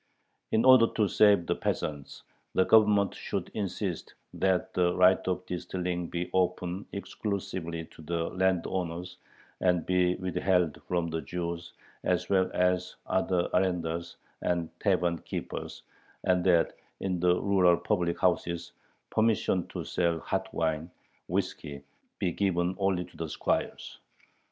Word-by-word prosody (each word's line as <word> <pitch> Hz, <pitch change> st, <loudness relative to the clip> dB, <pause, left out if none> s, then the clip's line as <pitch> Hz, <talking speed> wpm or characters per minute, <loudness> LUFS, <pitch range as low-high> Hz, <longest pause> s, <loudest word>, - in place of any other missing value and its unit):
In 110 Hz, -, +3 dB
order 130 Hz, -3 st, +8 dB
to 105 Hz, -2 st, +3 dB
save 100 Hz, -4 st, +5 dB
the -, -, +1 dB
peasants, 70 Hz, -2 st, -3 dB, 0.3 s
the 95 Hz, -, +4 dB
Government 105 Hz, -2 st, +5 dB
should -, -, -4 dB
insist 95 Hz, -3 st, -3 dB, 0.2 s
"that 95 Hz, -1 st, 0 dB
the 90 Hz, -1 st, +2 dB
right 90 Hz, +1 st, +6 dB
of 90 Hz, 0 st, -1 dB
distilling 90 Hz, -1 st, -3 dB
be 85 Hz, +1 st, -3 dB
open 90 Hz, +1 st, 0 dB
exclusively 95 Hz, -5 st, -4 dB
to 80 Hz, -, -16 dB
the 85 Hz, +1 st, -2 dB
landowners, 90 Hz, -1 st, -1 dB, 0.4 s
and 90 Hz, -3 st, +2 dB
be 90 Hz, -1 st, +2 dB
withheld 90 Hz, -3 st, 0 dB
from 85 Hz, -2 st, -1 dB
the 80 Hz, 0 st, -2 dB
Jews 85 Hz, +3 st, -5 dB, 0.3 s
as 90 Hz, 0 st, 0 dB
well 95 Hz, -1 st, +3 dB
as 90 Hz, 0 st, +1 dB
other 90 Hz, -2 st, +1 dB
arendars 85 Hz, -2 st, 0 dB, 0.3 s
and 85 Hz, -2 st, -1 dB
tavern 90 Hz, -4 st, +1 dB
keepers," -, -, -6 dB, 0.4 s
and 90 Hz, -1 st, +2 dB
that 85 Hz, -3 st, +4 dB, 0.3 s
in 90 Hz, -2 st, -1 dB
the 90 Hz, 0 st, +3 dB
rural 95 Hz, -4 st, +4 dB
public 90 Hz, -5 st, 0 dB
houses 85 Hz, -1 st, 0 dB, 0.4 s
"permission 110 Hz, -5 st, +2 dB
to -, -, -5 dB
sell 85 Hz, -2 st, 0 dB
hot 95 Hz, +3 st, -3 dB
wine 80 Hz, 0 st, -1 dB, 0.4 s
[whiskey] 70 Hz, -1 st, -3 dB, 0.3 s
be 90 Hz, -, 0 dB
given 90 Hz, -2 st, 0 dB
only 95 Hz, -2 st, +1 dB
to -, -, -19 dB
the 80 Hz, -1 st, -4 dB
squires." -, -, -2 dB
90 Hz, 130 wpm, -29 LUFS, 85-95 Hz, 0.4 s, order